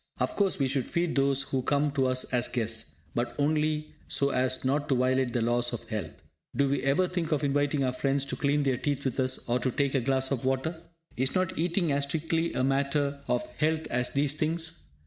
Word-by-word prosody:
Of - - 0
course, 200 -2 +2
we 135 - +1
should 130 -1 0
feed 170 -1 -1
those 140 0 +3
who 130 - -1
come 145 +2 +1
to 135 -2 +1
us 130 0 +1
as 125 -1 +3
guests, 115 -2 -2 0.2
but 120 0 -2
only 150 +1 0
so 140 -1 +2
as 130 0 0
not 145 +3 0
to 135 - +3
violate 130 0 +2
the 120 -1 0
laws 120 +1 +1
of 120 - -6
health. 110 -2 -5 0.3
Do 140 - +3
we 140 0 0
ever 140 +7 +2
think 175 -3 -2
of 150 -1 +1
inviting 145 0 +1
our 130 -1 0
friends 135 +1 0
to - - -3
clean 145 +1 +1
their 135 -3 +1
teeth 140 +1 -2
with 130 0 -1
us, 130 0 +1
or 120 +1 +1
to 130 - 0
take 140 +1 0
a 135 - +2
glass 130 +1 +1
of 135 -3 -1
water? 135 +6 -1 0.4
Is 130 +1 0
not 185 -1 +1
eating 170 0 +1
as 140 0 +1
strictly 165 +3 -1
a - - +1
matter 140 +1 +1
of 125 0 0
health 155 +1 +1
as 125 +1 +1
these 140 +2 +1
things? 160 +2 -2
140 Hz, 225 wpm, -28 LUFS, 130-150 Hz, 0.4 s, those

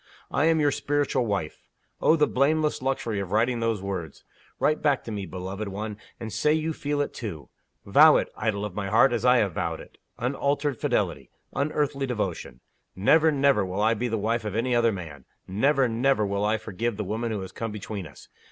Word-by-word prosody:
I 145 - +2
am 165 -1 +3
your 145 -1 +3
Spiritual 140 -4 0
Wife! 95 -7 -3 0.4
Oh, 160 - +5
the 150 -2 +4
blameless 150 +3 +1
luxury 130 -5 -1
of 95 -2 -5
writing 120 +3 +2
those 115 -4 -1
words! 90 -6 -5 0.4
Write 155 +1 +2
back 145 -3 +2
to 115 - -7
me, 100 -3 -4
beloved 95 +4 -5
one, 105 +2 -5 0.2
and 110 -2 -6
say 150 - +2
you 160 +1 -1
feel 145 -1 -2
it 145 - -3
too. 85 - -7 0.4
Vow - - +7
it, - - 0
idol 105 -2 -1
of 105 - -6
my 100 0 -3
heart, 115 +5 +4
as 120 0 -1
I 125 0 +6
have 100 -6 +1
vowed - - -2
it. - - -14 0.2
Unalterable 140 +1 -1
fidelity! - - -1 0.2
unearthly 140 -1 -1
devotion! 95 - -4 0.3
Never, 155 +12 +4
never 140 -6 +3
will 95 +2 -3
I 110 +1 +4
be 120 +2 -2
the 115 -1 -1
wife 115 +3 -1
of 105 -1 -4
any 120 +3 0
other 120 -1 +3
man! 80 - -8 0.2
Never, 130 +7 +2
never 120 -1 +2
will 100 +1 -1
I 110 +1 +2
forgive 110 +1 -3
the 105 - -2
woman 110 +4 -3
who 105 -3 -2
has 95 - -7
come 115 -1 -4
between 105 -3 -6
us! 70 - -15
115 Hz, 205 wpm, -26 LUFS, 100-140 Hz, 0.4 s, Vow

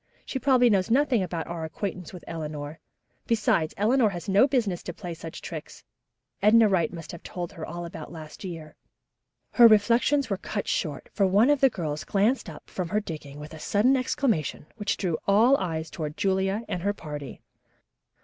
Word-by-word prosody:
"She 265 - -3
probably 255 -1 +4
knows 190 -3 +2
nothing 255 -2 +3
about 170 -3 -3
our 170 -1 -5
acquaintance 180 +2 -5
with 180 - -10
Eleanor; 155 -1 -6 0.5
besides, 215 -8 +1
Eleanor 225 +2 +3
has 175 -1 -7
no 200 +7 +5
business 225 -10 0
to 175 - -7
play 175 -1 -6
such 165 0 -8
tricks. - - -8 0.6
Edna 220 +2 +6
Wright 180 -6 +1
must 165 -2 -8
have 170 - -9
told 175 -2 -6
her 160 - -9
all 175 +2 -5
about 160 -2 -8
last 155 0 -10
year." 165 -5 -7 0.8
Her 240 -1 +8
reflections 235 +6 +4
were 195 - -1
cut 205 +2 -4
short, 150 -5 -2
for 195 - +3
one 210 +9 +4
of 290 - +2
the 270 - +6
girls 155 -9 -4
glanced 210 +3 +1
up 155 - -11
from 180 -3 -4
her 210 - +1
digging 150 -7 -8
with 150 +1 -9
a 160 - -9
sudden 220 - +3
exclamation 255 - -1
which 205 -2 -2
drew 170 -4 -1
all 220 +7 +5
eyes 160 - -3
toward 150 -2 -5
Julia 195 +2 0
and 180 - -3
her 200 +3 0
party. 150 -6 -7
190 Hz, 185 wpm, -26 LUFS, 160-220 Hz, 0.8 s, Her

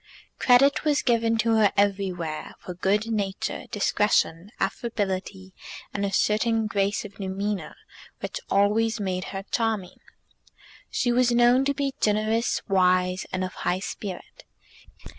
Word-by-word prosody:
Credit 275 +3 +5
was 300 -2 +2
given 230 -2 +2
to 225 0 +2
her 210 -2 +4
everywhere 190 -6 -1
for 180 - -8
good 205 +5 0
nature, 200 -3 -2
discretion, 205 -3 +1
affability, 195 -2 -3 0.4
and 200 - -2
a 200 - -1
certain 220 +3 +2
grace 205 -1 0
of 200 -1 -11
demeanour 195 -3 -3 0.4
which - - -5
always 215 +3 +2
made 185 -2 -2
her 195 0 -6
charming. 220 -6 -1 0.9
She 245 - 0
was 245 0 +3
known 240 +2 +4
to 280 0 0
be 275 -1 -1
generous, 215 +2 +1
wise, 185 -1 +2
and 185 0 -1
of 185 - -4
high 180 - -1
spirit. 195 -1 -7
205 Hz, 130 wpm, -25 LUFS, 190-225 Hz, 0.9 s, Credit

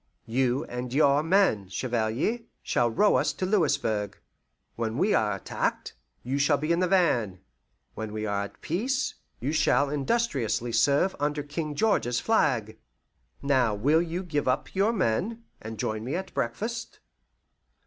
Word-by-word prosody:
You 125 +4 +1
and 125 0 -5
your 140 +1 +4
men, 165 - +2
Chevalier, 120 - -1 0.2
shall 120 - +1
row 205 - +3
us - - +1
to 185 - -3
Louisburg. 145 - 0 0.6
When 115 0 -2
we 205 +7 +2
are 105 -2 +2
attacked, 95 - -3 0.3
you 135 +3 -2
shall 145 +1 +3
be 155 +3 -2
in 170 - +2
the 185 - +2
van; 125 - +2 0.5
when 110 -1 -5
we 110 0 -3
are 100 -1 -1
at - - -14
peace, 255 - -1 0.3
you 135 +5 -2
shall 140 -2 +2
industriously 135 - 0
serve 140 +10 +3
under 145 0 -1
King 150 0 -4
George's 125 - +1
flag. 115 - +1 0.6
Now 130 -6 +2
will 145 +10 +3
you 175 +2 -3
give 150 -6 -2
up 130 - 0
your 200 +4 +2
men, 215 - -1 0.2
and 110 0 -7
join 110 +1 -2
me 130 +7 -3
at 190 +2 -5
breakfast?" 225 - -3
140 Hz, 150 wpm, -27 LUFS, 115-175 Hz, 0.6 s, your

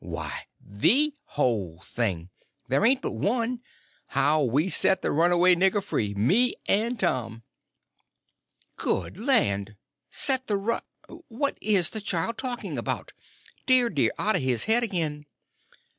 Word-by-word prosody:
"Why, - - -6
the 265 - +2
whole 105 - -2
thing. 95 -7 -3 0.4
There 135 +8 +1
ain't 260 +3 +3
but - - -2
one; 240 +2 -1 0.5
how 145 +4 +2
we 140 +6 +1
set 190 0 +1
the - - 0
runaway 175 +3 +4
nigger 190 +3 +2
free—me 125 - +1
and 230 +3 0
Tom." 115 - -2 1.3
"Good 180 - -2
land! 110 - +1 0.3
Set 265 -2 +2
the 205 - 0
run—What 250 - -5
is 195 -6 +3
the 220 - -3
child 205 +3 -2
talking 250 -2 -4
about! - - -4 0.5
Dear, 255 -2 +4
dear, 135 - +2
out 215 +1 +1
of - - +1
his 130 -3 0
head 230 +2 +3
again!" 155 -8 -2
185 Hz, 130 wpm, -26 LUFS, -, 1.3 s, runaway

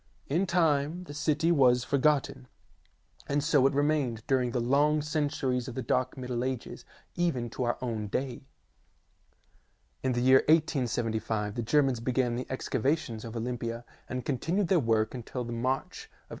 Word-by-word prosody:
In 175 +7 0
time 165 -1 +1
the 145 - -9
city 155 +2 +1
was 125 -6 +4
forgotten, 140 - +1 0.8
and 145 0 0
so 145 -4 +4
it 135 - -2
remained 145 -6 +1
during 130 -2 +1
the 120 - -1
long 145 +5 +2
centuries 145 -5 -1
of 125 - -7
the 130 - -3
dark 125 +3 0
Middle 125 -1 -3
Ages, 130 -2 -4 0.3
even 130 -10 -1
to - - -6
our 120 - 0
own 110 -4 -3
day. 125 +3 -3 1.6
In 130 -1 0
the 120 - 0
year 130 +1 +6
1875 115 -8 +1
the 120 - -3
Germans 135 +1 +2
began 120 0 0
the 125 - -3
excava 130 +2 0
tions 115 -8 -8
of 115 0 -7
Olympia 115 0 -4 0.2
and 125 0 -4
continued 165 +8 0
their 185 - +4
work 110 -4 +1
until 125 0 -5
the 120 0 -5
March 130 +3 -2
of - - -26
1881. - - -31
130 Hz, 165 wpm, -29 LUFS, 120-145 Hz, 1.6 s, year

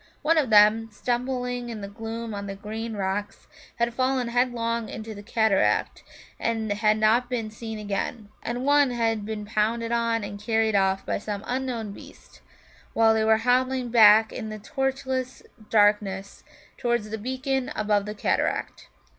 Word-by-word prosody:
One 325 +3 +3
of 275 -6 0
them, 215 +1 +5
stumbling 245 +1 -2
in 220 -3 -6
the 200 - -5
gloom 225 +2 -6
on 200 0 -5
the 195 - -5
green 220 +3 -6
rocks, 200 +1 -3 0.3
had 235 0 0
fallen 255 -1 0
headlong 235 -2 0
into 220 0 -7
the 205 - -9
cataract, 220 -1 +1 0.4
and 225 -2 -1
had 215 +1 +2
not 225 +3 +3
been 230 -4 -3
seen 220 0 -7
again; 210 +1 -4
and 245 +2 -3
one 285 -1 +4
had 225 -3 -1
been 215 -1 -4
pounced 225 +2 -1
on 230 -1 +1
and 205 0 -7
carried 220 0 +1
off 195 0 +1
by - - -1
some 205 -1 -5
unknown 245 -4 -3
beast - - -14 0.5
while 225 0 +4
they 220 0 +1
were 220 0 +4
hobbling 255 0 +2
back 220 -1 +6
in 220 -3 -5
the 215 - -6
torchless 260 +2 -3 0.3
darkness 205 -2 +1 0.3
towards 235 -4 -1
the 220 - -4
beacon 260 +3 -2
above 210 -1 +1
the 210 - -5
cataract. - - -1
225 Hz, 160 wpm, -25 LUFS, 210-245 Hz, 0.5 s, back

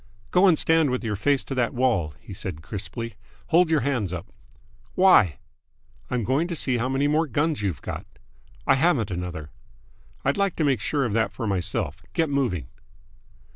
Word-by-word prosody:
"Go 185 +2 +5
and 170 -4 +5
stand 160 -2 +3
with 125 0 -2
your 110 -2 -1
face 140 +7 +1
to - - -5
that 125 -2 0
wall," 110 - +1
he 100 - -11
said 90 -4 -6
crisply. 105 +5 -6 0.4
"Hold 175 0 +4
your 160 -3 +3
hands 120 -8 -1
up!" 90 +3 -7 0.6
"Why?" 150 - +5 0.7
"I'm 125 -2 -1
going 135 - +1
to 175 - -3
see 130 -5 +1
how 125 +3 0
many 135 +2 +1
more 155 +2 +2
guns 145 +1 0
you've 90 -10 -3
got." - - -6 0.6
"I - - +5
haven't 135 - +2
another." 85 -4 -5 0.7
"I'd 140 - +2
like 200 -2 +1
to 160 - 0
make 135 -5 +2
sure 140 +2 0
of 115 - -2
that 115 0 +1
for 115 - -4
myself. 100 -1 -1
Get 160 -3 +1
moving!" 120 - 0
125 Hz, 180 wpm, -25 LUFS, 100-150 Hz, 0.7 s, Go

